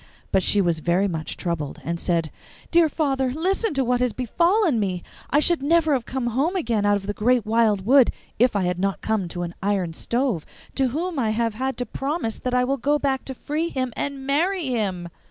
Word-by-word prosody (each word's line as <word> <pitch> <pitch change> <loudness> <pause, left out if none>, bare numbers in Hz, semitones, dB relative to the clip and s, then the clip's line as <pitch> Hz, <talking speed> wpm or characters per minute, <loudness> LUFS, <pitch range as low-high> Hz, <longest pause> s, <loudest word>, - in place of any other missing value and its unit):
But 190 - +3
she 205 +2 +3
was 170 -3 +1
very 175 +5 +1
much 160 -4 -4
troubled, 165 -5 -3
and 170 +1 -3
said, 165 -3 0 0.4
'Dear 335 -2 +5
father, 270 -4 0
listen 370 - 0
to 270 - +2
what 245 0 +1
has 250 -3 +1
befallen 335 - +2
me! 185 -4 -2 0.3
I 290 - +4
should 335 0 +3
never 315 +1 +3
have 250 -4 -1
come 265 -2 -2
home 270 - 0
again 230 - 0
out 205 - +4
of 200 -1 -4
the 205 - -2
great 240 +2 +2
wild 215 -3 +2
wood 260 +1 +6 0.3
if 245 -1 +4
I 200 - +1
had 180 0 -1
not 195 +1 -1
come 215 -4 -1
to 175 +1 -4
an 170 0 -5
iron 190 -4 0
stove, 235 - -1 0.3
to 270 -1 +1
whom 320 +5 -2
I 225 -4 +1
have 225 +1 0
had 260 +4 -3
to 245 - -1
promise 270 -1 -3
that 250 - -3
I 250 - +3
will 270 +2 0
go 290 +2 +1
back 270 -2 -1
to 265 - -5
free 310 +6 -2
him 255 -5 -2
and 275 -1 -4
marry 340 +6 +1
him! 195 -8 -1
245 Hz, 220 wpm, -23 LUFS, 200-280 Hz, 0.4 s, wood